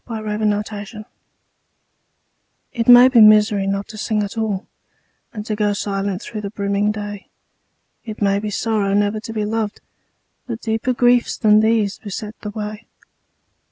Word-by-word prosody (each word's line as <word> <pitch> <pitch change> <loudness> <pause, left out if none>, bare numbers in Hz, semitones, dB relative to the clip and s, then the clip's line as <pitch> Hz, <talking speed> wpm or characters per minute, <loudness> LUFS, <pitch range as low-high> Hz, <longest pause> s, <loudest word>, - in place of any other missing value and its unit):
LIFE'S 215 -1 -1
TRAGEDY 215 +1 -8 1.7
It 230 -2 -2
may 245 +1 +9
be 250 -3 +5
misery 210 -2 +5
not 195 0 -2
to 215 -1 -9
sing 210 0 -1
at 205 +2 -6
all 215 -4 -2 0.7
And 210 -2 -7
to 215 - -2
go 210 -1 0
silent 200 -1 -3
through 215 -2 -6
the 200 - -5
brimming 200 0 -1
day. 205 -1 -7 0.7
It 220 -2 -8
may 200 -1 +1
be 210 +1 -4
sorrow 205 -1 -1
never 205 +1 +1
to 225 - -8
be 215 -2 -2
loved, 220 -1 -3 0.7
But 230 -2 -5
deeper 225 +3 -1
griefs 245 0 +2
than 215 -2 +4
these 220 -2 +1
beset 210 +1 -6
the 210 - -5
way. 210 +1 -7
210 Hz, 155 wpm, -20 LUFS, 205-220 Hz, 1.7 s, may